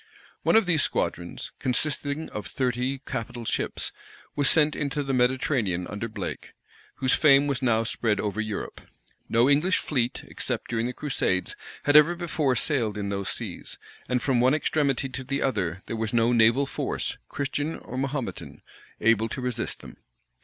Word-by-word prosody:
One - - +3
of 225 - +6
these 165 -4 +3
squadrons, 85 -8 -2
consisting 145 +3 -1
of 105 - -6
thirty 130 +1 -1
capital 115 +1 -5
ships, - - 0 0.4
was 145 -1 +3
sent 150 -2 +4
into 145 0 -1
the 135 -1 -2
Mediterranean 125 - +1
under 105 +5 -4
Blake, 110 - -6 0.4
whose 130 -1 +1
fame 140 -2 +6
was 140 -3 -1
now 115 -3 +2
spread 110 -1 0
over 105 +1 -1
Europe. 110 -2 -5 0.5
No 115 +2 +4
English 150 +7 +4
fleet, 125 -4 -1
except - - -4
during 115 0 0
the - - -2
crusades, 125 -11 -1 0.3
had 145 - +2
ever 155 +3 +7
before 160 -6 0
sailed 120 -8 0
in 100 -1 -3
those 100 -1 -2
seas; - - -6 0.3
and 125 -1 0
from 130 -4 +2
one 130 +4 +4
extremity 140 -3 +1
to 130 0 -6
the 140 +2 -2
other 95 -8 -1
there - - -4
was 110 0 -2
no 120 +1 +3
naval 115 +4 +5
force, - - -3
Christian 145 +3 -2
or 125 - -9
Mahometan, 135 0 -4 0.4
able 115 0 +3
to 130 - -5
resist 125 -2 -2
them. - - -12
125 Hz, 165 wpm, -26 LUFS, 115-145 Hz, 0.5 s, ever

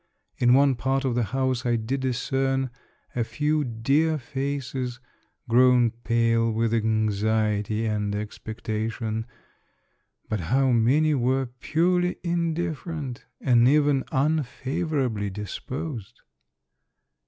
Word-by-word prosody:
In 120 0 +5
one 140 0 +5
part 135 +2 -1
of 130 - +1
the 120 -1 +1
house 130 +2 -1
I 120 -2 +1
did 115 +4 -2
discern 135 +1 0 0.4
a 120 - +1
few 150 +5 0
dear 140 +7 +1
faces, 130 -2 -4 0.5
grown 125 0 +5
pale 115 0 +1
with 115 +1 0
anxiety 110 -1 +1
and 105 -1 -1
expectation; 110 +1 -4 1.0
but 110 - -2
how 130 +10 +2
many 135 +7 +3
were 130 0 +1
purely 175 +8 0
in 170 -2 0
different, 160 -5 -4 0.2
and 120 -2 +5
even 145 -1 +3
unfavorably 140 - -1
disposed 110 - -6
125 Hz, 105 wpm, -25 LUFS, 115-140 Hz, 1.0 s, In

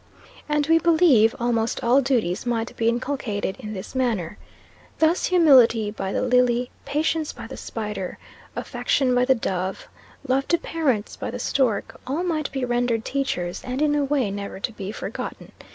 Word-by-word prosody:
And, 295 -1 +2
we 325 +1 +4
believe, 315 -10 +5
almost 235 -1 0
all 250 +4 +4
duties 230 -9 0
might 230 -1 -1
be 230 0 +2
inculcated 235 -5 -2
in 215 -4 -6
this 190 +2 -7
manner. 225 -9 -1 0.6
Thus, 320 +2 +2
humility 255 - +5
by 195 -2 -4
the - - -1
lily, 250 -1 +2
patience 305 +2 0
by - - -9
the - - -8
spider, 210 -4 -5 0.4
affection 260 -3 0
by 245 0 +3
the 265 0 +4
dove, 190 -4 -3 0.4
love 270 +1 +1
to 340 - +3
parents 275 -12 -1
by - - -5
the - - -5
stork, 240 -7 0
all 295 +7 -1
might 315 -4 -1
be 265 -2 -2
rendered 240 -2 0
teachers, 180 -11 -2
and 255 +1 -4
in 300 0 +2
a 295 -1 +2
way 270 -7 0
never 200 -1 -6
to 235 - -3
be 200 -2 -6
forgotten. - - -6
245 Hz, 170 wpm, -24 LUFS, 215-285 Hz, 0.6 s, believe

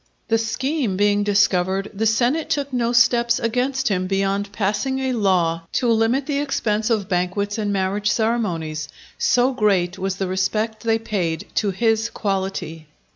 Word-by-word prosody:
The 225 0 +3
scheme 240 -1 -1
being 205 0 +2
discovered, 195 -1 +1
the 220 +2 0
senate 250 +9 +1
took 285 -4 -1
no 240 -1 +1
steps 235 0 +3
against 250 +3 0
him 185 -2 0
beyond 195 +1 -1
passing 210 +6 -1
a 265 -1 -1
law 175 -6 +1
to 245 - +1
limit 230 +5 +2
the 280 -1 -1
expense 220 -6 -1
of 215 -5 0
banquets 200 +3 -1
and 205 -1 -1
marriage 200 +2 0
ceremonies. 170 - -1 0.3
So 250 +2 +3
great 195 -6 +1
was 190 0 -2
the 195 - -2
respect 215 +4 -1
they 225 0 +1
paid 180 -8 -2
to 210 - +1
his 225 +3 +1
quality. 190 -7 -3
210 Hz, 155 wpm, -21 LUFS, 190-235 Hz, 0.3 s, The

